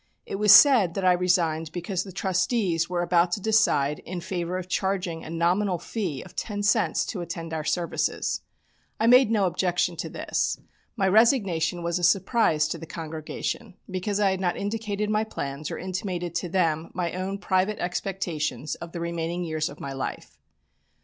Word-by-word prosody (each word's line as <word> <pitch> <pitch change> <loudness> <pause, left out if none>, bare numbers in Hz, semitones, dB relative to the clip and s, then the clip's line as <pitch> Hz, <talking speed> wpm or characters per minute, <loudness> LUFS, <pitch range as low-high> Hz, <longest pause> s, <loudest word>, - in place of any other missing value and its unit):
It - - -4
was 210 0 +5
said 220 - +8
that 195 - -1
I 185 - +6
resigned 170 -3 +1
because 180 +1 -3
the 195 - -9
trustees 185 -2 0
were 175 -1 0
about 175 0 +3
to - - 0
decide 200 -9 +2
in 180 0 -6
favour 175 0 -3
of 185 -1 -5
charging 185 -3 -1
a - - -8
nominal 175 +3 +1
fee 175 - -4
of 180 - -15
ten 205 -2 -3
cents 210 - +2
to 190 - -4
attend 165 -1 -6
our 155 -1 -2
services. 170 +2 -1 0.6
I 225 - +2
made 250 0 +7
no 210 -3 +2
objection 180 0 0
to - - -4
this. - - -1 0.4
My 195 -5 +1
resignation 190 - +3
was 170 +1 0
a - - -6
surprise 185 -4 +3
to 165 - -4
the 165 - -9
congregation 160 +6 -5 0.2
because 195 +2 -2
I 200 -2 +3
had 190 - -2
not 180 -2 0
indicated 210 0 -2
my 215 0 +2
plans 140 -8 -5
or - - -4
intimated 180 -2 -4
to 170 +1 -2
them 165 -3 0
my 175 -2 -2
own 190 +2 -3
private 195 +1 0
expectations 170 -6 -3
of 170 -1 -8
the 170 - -4
remaining 170 +1 -3
years 155 -2 -2
of - - -12
my 140 -1 -5
life. 135 - -6
180 Hz, 180 wpm, -26 LUFS, 165-200 Hz, 0.6 s, said